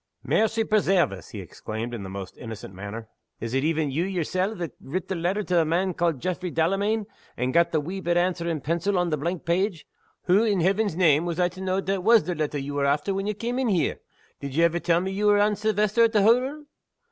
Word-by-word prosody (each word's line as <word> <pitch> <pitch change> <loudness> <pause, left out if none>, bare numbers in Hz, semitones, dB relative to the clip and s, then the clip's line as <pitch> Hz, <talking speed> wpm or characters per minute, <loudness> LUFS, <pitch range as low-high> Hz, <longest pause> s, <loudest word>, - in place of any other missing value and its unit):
"Mercy 225 +1 +1
presairve 195 - +2
us!" 95 -4 -9
he - - -7
exclaimed, 110 +3 -6
in 115 - -5
the 95 - -7
most 95 0 -7
innocent 110 -4 -8
manner. 100 +4 -7 0.3
"Is 115 +1 -5
it 135 +1 +1
even 155 -2 0
You 155 +6 0
Yersel' 185 +2 -1
that 170 -5 -4
writ 170 +6 -4
the - - 0
letter 180 +5 -1
to 180 - -4
the 170 -2 +5
man 175 +4 0
ca'ed 170 -5 0
Jaffray 185 +3 -3
Delamayn, 195 +7 0 0.3
and 125 +1 -1
got 170 0 +4
the 155 - +2
wee 180 +6 -5
bit 175 0 +1
answer 175 -1 0
in 160 -3 -2
pencil 170 +6 0
on 175 -1 +1
the 155 - +1
blank 170 +4 -3
page? 175 +1 0 0.4
Hoo, 190 +5 +4
in 205 -4 +1
Heeven's 195 +1 +1
name, 165 -3 +4
was 170 0 -3
I 175 0 +3
to 185 +2 -11
know 190 0 0
that 195 -1 -2
was 225 +1 +6
the 180 +3 -2
letter 155 -2 -2
ye 140 +1 -4
were 145 0 -1
after 145 +7 +1
when 195 +1 -2
ye 210 - -1
cam' 235 +5 -3
in 260 - +1
here? 185 -7 +1 0.4
Did 140 -1 -6
ye 165 - +3
ever 170 0 +2
tell 170 +1 +2
me 190 +1 -3
ye 200 +2 -3
were 205 0 +5
Anne 210 +1 +3
Silvester, 215 +2 +2
at 225 - 0
the 210 -2 +4
hottle? 255 +7 +2
175 Hz, 240 wpm, -25 LUFS, 155-200 Hz, 0.4 s, was